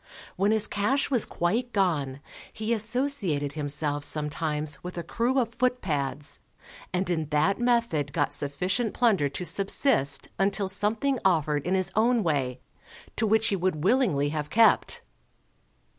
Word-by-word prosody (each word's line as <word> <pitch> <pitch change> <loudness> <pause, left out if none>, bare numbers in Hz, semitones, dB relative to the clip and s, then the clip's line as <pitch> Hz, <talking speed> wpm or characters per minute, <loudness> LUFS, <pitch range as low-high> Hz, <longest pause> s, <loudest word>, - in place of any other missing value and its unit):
When 195 +2 +1
his 220 -1 +3
cash 215 +8 -1
was 245 -5 +3
quite 230 +8 -2
gone, 145 -9 0 0.3
he 220 +2 -2
associated 220 - +1
himself 145 0 -1
sometimes 150 -1 -2
with 180 0 -7
a 170 - -3
crew 240 +9 -1
of 235 -3 0
footpads, 165 - -2 0.5
and 185 +1 -1
in 160 -4 -2
that 155 +8 +1
method 235 - 0
got 145 -1 0
sufficient 180 - -2
plunder 200 - +2
to 180 +6 -6
subsist 195 - +3
until 195 0 0
something 215 +7 +1
offered 155 -5 +1
in 185 - +1
his 190 0 0
own 230 +1 +2
way, 135 -6 -1 0.5
to 220 - 0
which 220 +1 +2
he 200 - 0
would 180 -5 -2
willingly 185 - +2
have 150 -1 -4
kept. 225 -1 +3
185 Hz, 145 wpm, -26 LUFS, 150-225 Hz, 0.5 s, his